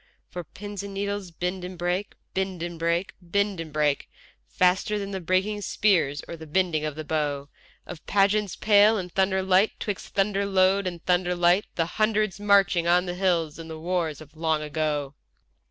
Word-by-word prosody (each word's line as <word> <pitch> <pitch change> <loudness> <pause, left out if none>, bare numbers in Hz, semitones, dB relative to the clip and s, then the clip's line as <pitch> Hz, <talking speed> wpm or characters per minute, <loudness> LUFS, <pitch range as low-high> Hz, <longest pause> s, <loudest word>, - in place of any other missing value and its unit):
For 175 - -5
pins 205 +4 -8
and 200 0 -8
needles 200 -1 -3
bend 180 +2 -4
and 180 0 -7
break, 180 +3 -2 0.2
bend 190 -2 -2
and 170 -1 -5
break, 170 +3 0
bend 200 +2 -1
and 165 -2 -6
break, 150 -1 0 0.4
Faster 185 - +2
than 200 -1 -4
the 190 -1 -4
breaking 190 +4 0
spears 180 -10 +1
or - - -6
the 160 -1 -11
bending 165 -1 +1
of 155 -2 -3
the 155 - -5
bow 145 -2 -2 0.4
Of 175 -3 -9
pageants 200 0 +2
pale 210 +1 +5
in 180 -3 -4
thunder 190 +1 +1
light, 190 +3 +3
'twixt 205 -3 -5
thunder 200 0 +1
load 190 0 +3
and 175 -2 -6
thunder 180 0 +2
light, 175 +3 +3
The 165 - +1 0.2
Hundreds 215 -2 +1
marching 195 -4 +3
on 180 +1 +4
the 175 - -3
hills 175 -4 0
in 165 - -8
the 160 -1 -7
wars 165 -3 -2
of 155 0 -14
long 160 -1 0
ago. 150 -2 -2
180 Hz, 185 wpm, -26 LUFS, 165-200 Hz, 0.4 s, pale